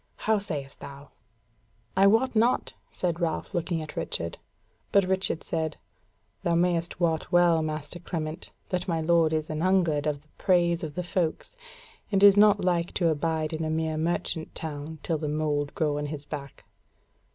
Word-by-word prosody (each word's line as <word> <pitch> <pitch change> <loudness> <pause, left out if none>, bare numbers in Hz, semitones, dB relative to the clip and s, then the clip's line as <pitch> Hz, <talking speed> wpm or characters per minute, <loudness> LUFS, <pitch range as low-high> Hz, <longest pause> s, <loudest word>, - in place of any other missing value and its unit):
How 220 -1 +1
sayest 150 -9 -5
thou?" 140 0 -10 0.8
"I 195 +1 +6
wot 225 +5 +3
not," 235 +3 +2 0.3
quoth 175 -2 0
Ralph 170 +3 -2
looking 170 -2 -1
at 155 - -9
Richard. 85 0 -3 0.5
Said 200 - +5
Richard: 165 -4 -1 0.6
"Thou 170 - +1
mayst 170 0 +1
wot 165 -3 0
well, 175 -2 +5
master 155 +2 -4
Clement, 160 -2 -5 0.2
that 180 -1 -2
my 165 -3 0
lord 165 0 +3
is 155 -1 -1
anhungered 160 -2 +1
of 145 -1 -2
the 155 - -30
praise 175 -3 +3
of 155 -2 -5
the 180 - -2
folks, 175 - -2 0.6
and 195 -1 +2
is 200 -1 +9
not 205 -2 +5
like 175 -1 0
to 170 - +3
abide 160 0 -1
in 160 0 -2
a 155 - -1
mere 160 0 -1
merchant 160 0 -2
town 155 0 -5
till 160 -3 -1
the 150 -1 -2
mould 150 -1 -1
grow 150 -2 0
on 150 - -3
his 145 -1 -6
back." 140 -2 -8
160 Hz, 165 wpm, -27 LUFS, 155-180 Hz, 0.8 s, is